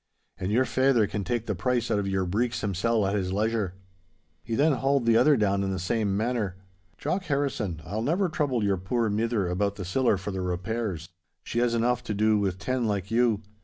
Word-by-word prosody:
And 95 Hz, +2 st, -2 dB
your 125 Hz, +4 st, +3 dB
faither 130 Hz, -5 st, +3 dB
can 100 Hz, 0 st, -3 dB
take 120 Hz, +1 st, -2 dB
the 105 Hz, -, -1 dB
price 120 Hz, +5 st, -1 dB
out 105 Hz, -, +2 dB
of 100 Hz, -, -2 dB
your 95 Hz, -1 st, 0 dB
breeks 115 Hz, +7 st, -1 dB
himsel' 105 Hz, +2 st, +1 dB
at 95 Hz, -, 0 dB
his 95 Hz, -3 st, -1 dB
leisure.' 105 Hz, -2 st, 0 dB, 0.7 s
He 115 Hz, +6 st, -3 dB
then 150 Hz, +6 st, +4 dB
hauled 135 Hz, -1 st, +1 dB
the 115 Hz, -1 st, +4 dB
other 145 Hz, +4 st, +5 dB
down 100 Hz, -2 st, +1 dB
in 95 Hz, -, -1 dB
the 95 Hz, -, -2 dB
same 100 Hz, +2 st, 0 dB
manner. 110 Hz, -4 st, -1 dB, 0.4 s
'Jock 180 Hz, +6 st, -2 dB
Harrison, 125 Hz, -, -1 dB
I'll 105 Hz, +5 st, -3 dB
never 175 Hz, -, +1 dB
trouble 145 Hz, -8 st, 0 dB
your 100 Hz, -1 st, +2 dB
puir 110 Hz, +4 st, -1 dB
mither 110 Hz, -2 st, 0 dB
about 100 Hz, +3 st, 0 dB
the 95 Hz, -, -6 dB
siller 110 Hz, +3 st, +2 dB
for 95 Hz, +2 st, -5 dB
the 95 Hz, -1 st, -3 dB
repairs. 90 Hz, -1 st, -3 dB, 0.3 s
She 120 Hz, -, -2 dB
has 120 Hz, -1 st, +2 dB
enough 120 Hz, +1 st, +1 dB
to 105 Hz, -, -2 dB
do 110 Hz, +1 st, +3 dB
with 95 Hz, -3 st, -1 dB
ten 120 Hz, +4 st, -1 dB
like 100 Hz, -1 st, -2 dB
you. 115 Hz, -2 st, +2 dB
110 Hz, 210 wpm, -27 LUFS, 95-120 Hz, 0.7 s, other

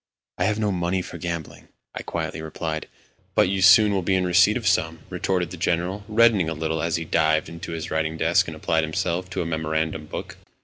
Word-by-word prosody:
"I 90 Hz, -, +2 dB
have 105 Hz, +1 st, +1 dB
no 105 Hz, -2 st, 0 dB
money 90 Hz, 0 st, -1 dB
for -, -, -9 dB
gambling," 85 Hz, -3 st, -6 dB, 0.3 s
I -, -, -5 dB
quietly -, -, -4 dB
replied. 80 Hz, 0 st, -4 dB, 0.5 s
"But -, -, +4 dB
you 95 Hz, -, 0 dB
will -, -, -1 dB
soon 100 Hz, +1 st, +6 dB
be 95 Hz, +2 st, +1 dB
in 95 Hz, -1 st, +1 dB
receipt 95 Hz, +5 st, +4 dB
of 115 Hz, -, -6 dB
some," 80 Hz, -4 st, +1 dB
retorted 90 Hz, -1 st, -1 dB
the 90 Hz, -, -7 dB
General, 90 Hz, +4 st, -1 dB
reddening 110 Hz, -6 st, +4 dB
a 80 Hz, -, -3 dB
little 80 Hz, 0 st, -2 dB
as 85 Hz, 0 st, 0 dB
he 80 Hz, -, -3 dB
dived 80 Hz, -1 st, +2 dB
into 85 Hz, 0 st, -7 dB
his 80 Hz, 0 st, -5 dB
writing 80 Hz, 0 st, -1 dB
desk 80 Hz, +2 st, +2 dB
and 80 Hz, -1 st, -6 dB
applied 80 Hz, +1 st, +1 dB
himself 85 Hz, +3 st, -2 dB
to -, -, -2 dB
a -, -, -7 dB
memorandum 80 Hz, -1 st, -2 dB
book. -, -, -7 dB
85 Hz, 215 wpm, -24 LUFS, 80-95 Hz, 0.5 s, soon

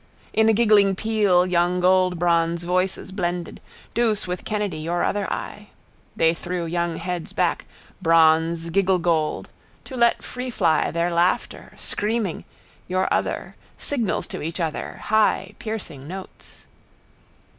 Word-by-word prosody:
In 220 Hz, 0 st, +4 dB
a -, -, +5 dB
giggling 210 Hz, -3 st, +4 dB
peal 205 Hz, -4 st, +2 dB
young 180 Hz, 0 st, +1 dB
goldbronze 175 Hz, -2 st, +2 dB
voices 185 Hz, +2 st, -1 dB
blended, 175 Hz, -2 st, -3 dB, 0.3 s
Douce 220 Hz, -3 st, +1 dB
with 180 Hz, 0 st, -5 dB
Kennedy 205 Hz, -6 st, -2 dB
your 170 Hz, +3 st, -1 dB
other 205 Hz, -1 st, -1 dB
eye. 210 Hz, 0 st, -5 dB, 0.5 s
They 165 Hz, 0 st, +3 dB
threw 175 Hz, +1 st, -4 dB
young 170 Hz, 0 st, -1 dB
heads 180 Hz, -2 st, -4 dB
back, -, -, 0 dB, 0.3 s
bronze 165 Hz, 0 st, +3 dB
gigglegold, 175 Hz, -4 st, +1 dB, 0.4 s
to 265 Hz, -, -8 dB
let 235 Hz, -1 st, +3 dB
freefly 240 Hz, -10 st, 0 dB
their 170 Hz, +1 st, 0 dB
laughter, 175 Hz, +2 st, 0 dB
screaming, 210 Hz, -4 st, -2 dB, 0.4 s
your 185 Hz, +1 st, 0 dB
other, -, -, -2 dB, 0.2 s
signals 240 Hz, -9 st, -1 dB
to -, -, -5 dB
each 165 Hz, +4 st, -4 dB
other, 160 Hz, -3 st, -3 dB
high 210 Hz, -2 st, +2 dB
piercing 190 Hz, -11 st, -6 dB
notes. 190 Hz, +2 st, -10 dB
180 Hz, 125 wpm, -23 LUFS, 170-205 Hz, 0.5 s, a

